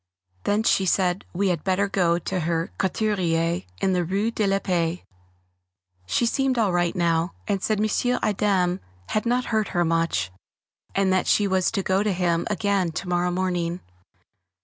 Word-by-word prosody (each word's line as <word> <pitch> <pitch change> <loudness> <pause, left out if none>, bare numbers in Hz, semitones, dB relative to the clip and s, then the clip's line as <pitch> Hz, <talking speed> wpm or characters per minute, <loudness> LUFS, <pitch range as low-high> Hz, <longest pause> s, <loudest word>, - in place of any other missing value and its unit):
Then 210 +2 +2
she 195 -4 +2
said 180 0 +1
we 195 +2 0
had 170 -4 -1
better 190 +1 +1
go 175 -4 +2
to 185 +2 -3
her 165 0 -1
couturier 175 -4 0 0.2
in 190 - +2
the 180 -1 +1
Rue 200 +6 0
de 215 -3 0
la 195 0 +2
Paix. 175 -3 -1 1.0
She 240 - +1
seemed 265 +2 +1
all 215 -5 +2
right 175 +1 +1
now, 170 0 +1
and 200 -2 0
said 215 0 0
M. 230 +4 +1
Adam 190 -3 +1 0.3
had 215 +2 0
not 245 +1 +1
hurt 215 -1 +2
her 175 - +3
much, 165 - 0 0.6
and 195 -1 +2
that 185 - +1
she 205 - +3
was 190 -1 +2
to 195 -4 -2
go 190 +2 +1
to 210 -1 +1
him 175 -2 0
again 200 -4 0
to 180 - -4
morrow 175 0 +1
morning. 175 -1 -1
185 Hz, 170 wpm, -24 LUFS, 175-205 Hz, 1.0 s, her